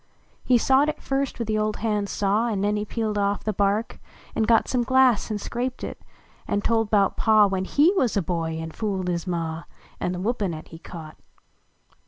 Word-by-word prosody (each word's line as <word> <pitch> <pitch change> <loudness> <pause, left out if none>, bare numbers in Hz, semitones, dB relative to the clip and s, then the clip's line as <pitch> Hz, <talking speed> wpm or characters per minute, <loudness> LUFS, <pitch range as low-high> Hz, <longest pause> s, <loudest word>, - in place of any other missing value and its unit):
He 250 - +4
sawed 270 +5 +3
it 305 - -4
first 275 0 -2
with 230 - -3
the 215 -1 0
old 215 0 0
hand 210 -2 -1
saw; 205 +3 +1
An 205 -4 -1
ncn 205 +1 +1
he 210 - -3
peeled 215 -1 -2
off 200 0 0
the 215 - -1
hark, 205 +3 0 0.3
an - - -1
got 225 0 +4
Some 250 - +1
glass 260 -2 +3
an 215 - -1
scraped 245 +4 -4
it; - - -6 0.5
an 205 - 0
tld 225 -2 +1
bout 200 -2 +2
Pa, 215 -2 +5
When 190 -1 -1
lie 305 +5 +6
wuz 250 - +1
a 195 - +1
hoy 165 -3 -2
an 160 0 -5
fooled 190 -2 -2
his 175 +1 -2
Ma, 165 -2 -3 0.3
An 180 - -1
the - - -4
whippin 200 -4 -1
at 155 - -10
he 165 - -11
caught. 160 -3 -10
210 Hz, 210 wpm, -24 LUFS, 190-230 Hz, 0.5 s, lie